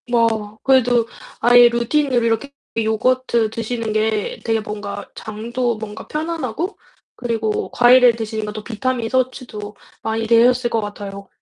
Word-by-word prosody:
뭐, 225 -3 +1
그래도 245 -3 +3 0.3
아예 245 0 +7
루틴으로 245 +2 +1
이렇게 230 +5 0 0.3
요거트 230 +1 +1
드시는 230 0 -3
게 215 -1 -1
되게 225 -1 +1
뭔가 210 0 -6
장도 235 +2 -3
뭔가 215 -1 -8
편안하고 320 - -3 0.4
그리고 225 -3 -2
과일을 245 -1 +6
드시는 220 -1 -4
것도 210 0 -6
비타민 240 +1 -2
섭취도 245 -5 -2 0.3
많이 225 0 -2
되셨을 240 +2 +4
것 225 - 0
같아요. 200 -1 -7
230 Hz, 305 characters per minute, -20 LUFS, 215-245 Hz, 0.4 s, 아예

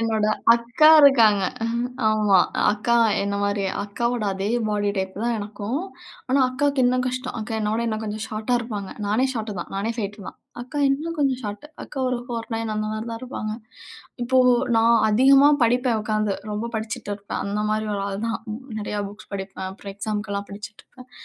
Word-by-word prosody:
என்னோட 220 -2 +1 0.3
அக்கா 235 +6 +4
இருக்காங்க. 225 -8 +6 0.7
ஆமா 210 -3 +4 0.3
அக்கா 235 +3 +1 0.3
என்ன 200 0 -2
மாரியே. 200 -1 0
அக்காவோட 235 +3 -2
அதே 195 +2 -2 0.2
பாடி 205 -1 0
டைப் 190 0 -2
தான் 235 0 +1
எனக்கும். 210 +6 -4 0.5
ஆனா 270 +1 +3
அக்காக்கு 275 +1 +1
இன்னும் 255 +1 +2
கஷ்டம். 255 0 -3
அக்கா 220 +1 -4
என்னோட 215 +2 0
இன்னும் 220 -1 -2
கொஞ்சம் 215 +1 -4
ஷார்ட்டா 220 +3 -1
இருப்பாங்க. 210 -5 -5
நானே 220 +6 +2
ஷார்ட் 220 -3 -4
தான். - - -8
நானே 210 +4 -1
5'2 205 -1 -4
தான். - - -12 0.2
அக்கா 255 +4 -6
இன்னும் 320 +4 -2
கொஞ்சம் 265 -3 +1
ஷார்ட். 210 +6 -6 0.2
அக்கா 275 - -9
ஒரு 250 -1 -1
4'9 225 -2 -4
அந்த 215 0 -2
மாரி 215 +2 -4
தான் 230 - -5
இருப்பாங்க. 215 -4 -4 0.7
இப்போ 260 +1 +2 0.4
நான் 230 +1 +5
அதிகமா 275 +5 +6
படிப்பேன் 245 -1 +2
உட்காந்து. 215 -2 0 0.2
ரொம்ப 230 +3 -3
படிச்சுட்டு 215 -2 -4
இருப்பேன். 200 0 -5
அந்த 210 +1 -1
மாரி 215 0 0
ஒரு 195 - -2
ஆள் 200 +3 -4
தான். 225 - -2 0.4
நிறையா 205 0 -3
புக்ஸ் 210 0 -14
படிப்பேன், 190 -1 -5
அப்புறம் 195 0 -9
எக்ஸாமுக்கெல்லாம் 205 -1 -3
படிச்சிட்டு 210 +1 -9
இருப்பேன். 255 0 -16
220 Hz, 170 wpm, -23 LUFS, 205-245 Hz, 0.7 s, இருக்காங்க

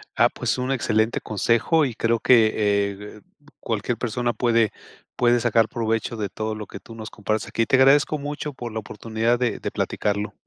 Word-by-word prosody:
Ah, - - +4
pues - - -2
un 125 +1 -2
excelente 110 -3 0
consejo 115 - +1
y 125 - -3
creo 115 +1 0
que, 110 -1 +5
eh, 100 0 -1 0.4
cualquier 115 +1 -2
persona 120 +1 -1
puede 115 -1 +2 0.4
puede 120 0 +3
sacar 115 -1 +3
provecho 115 0 -2
de 105 -3 -3
todo 110 +2 -4
lo 105 0 -6
que - - -10
tú 115 - -13
nos 110 0 -7
compartes 110 0 -3
aquí. 115 - 0
Te 130 - +2
agradezco 140 +3 +4
mucho 145 +1 -5
por 120 -2 -7
la 110 - -3
oportunidad 110 +3 -1
de 125 -2 -1
de - - -4
platicarlo. 105 0 -2
115 Hz, 185 wpm, -23 LUFS, 110-120 Hz, 0.4 s, que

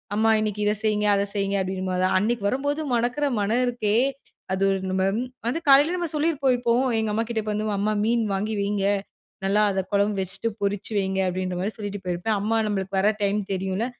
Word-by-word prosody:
"அம்மா 220 +1 +3
இன்னைக்கு 210 -1 -2
இத 210 - +3
செய்ங்க, 210 -1 +1
அத 200 - +1
செய்ங்க" 200 0 0
அப்படின்னு 185 0 -3
போது 185 0 +1
அன்னைக்கு 225 +1 -1
வரும்போது, 285 +5 -1
மணக்கிற 245 +5 0 0.2
மணம் 230 +5 +1
இருக்கே! 220 -3 0 0.6
அது 195 +1 +1 0.2
நம்ம 190 0 0 0.2
ம் 250 - -2 0.2
வந்து 265 +8 0
காலையில 290 +6 +6
நம்ம 345 -3 -2
சொல்லியிருப்போம். 295 -4 +2
இப்போ 235 -1 +1 0.3
எங்க 220 -1 -1
அம்மாகிட்ட, 225 0 -1
"இப்ப 215 - -3
வந்து 215 - -2
அம்மா 210 +2 +1
மீன் 235 +1 +2
வாங்கி 215 +3 -2
வைங்க, 200 -1 0 0.6
நல்லா 200 +2 +3
அத 190 - -1
குழம்பு 200 +1 +2
வச்சுட்டு 195 +4 -3
பொரிச்சு 200 +2 -2
வைங்க." 190 -1 0
அப்படின்ற 185 0 -2
மாதிரி 205 +4 -2
சொல்லிட்டு 205 -1 -5
போயிருப்பேன். 180 +5 -1
அம்மா 225 +2 +1
நம்மளுக்கு 195 -1 -2
வர 205 +2 +4
டைம் 200 +1 +1
தெரியும்ல, 190 +4 -1
210 Hz, 190 wpm, -24 LUFS, 195-230 Hz, 0.6 s, காலையில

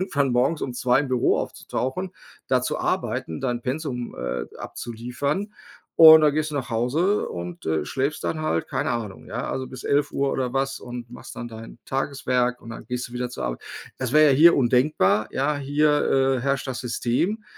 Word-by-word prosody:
irgendwann 145 -8 0
morgens 135 +6 +1
um 125 - -3
2 125 +1 +2
im 145 - -2
Büro 125 -2 +2
aufzutauchen, 175 +9 -3 0.4
da - - +3
zu - - -2
arbeiten, 80 - -2
dein 120 -2 -2
Pensum, 130 -3 -4
äh, 60 - -3
abzuliefern 125 - -4 0.4
und 160 -1 +10
dann 150 -1 +4
gehst 155 0 0
du 150 - -6
nach 130 -1 -3
Hause 145 - +1
und, 85 0 -7
äh, 80 -2 0
schläfst 135 - -2
dann 155 - -2
halt, 85 - 0
keine - - -1
Ahnung, 115 -5 -4
ja, - - -4
also 130 0 -3
bis 130 -1 -10
11:00 140 -1 +1
oder 125 -2 -2
was 135 0 -1
und 120 -1 -7
machst - - -11
dann 120 - -5
dein 115 +1 -10
Tageswerk 125 -2 -1
und 115 - -10
dann 115 - -9
gehst 125 0 -3
du 120 - -16
wieder 125 0 -3
zur - - -5
Arbeit. - - -3 0.4
Das 130 -2 -2
wäre 155 -1 +6
ja 130 - +2
hier 170 +3 +7
undenkbar. 125 -5 +2
Ja, 145 +2 0
hier, 145 -2 +2
äh, - - -4
herrscht 140 +2 -1
das 130 -2 -4
System. 125 - -1
130 Hz, 190 wpm, -24 LUFS, 120-145 Hz, 0.4 s, und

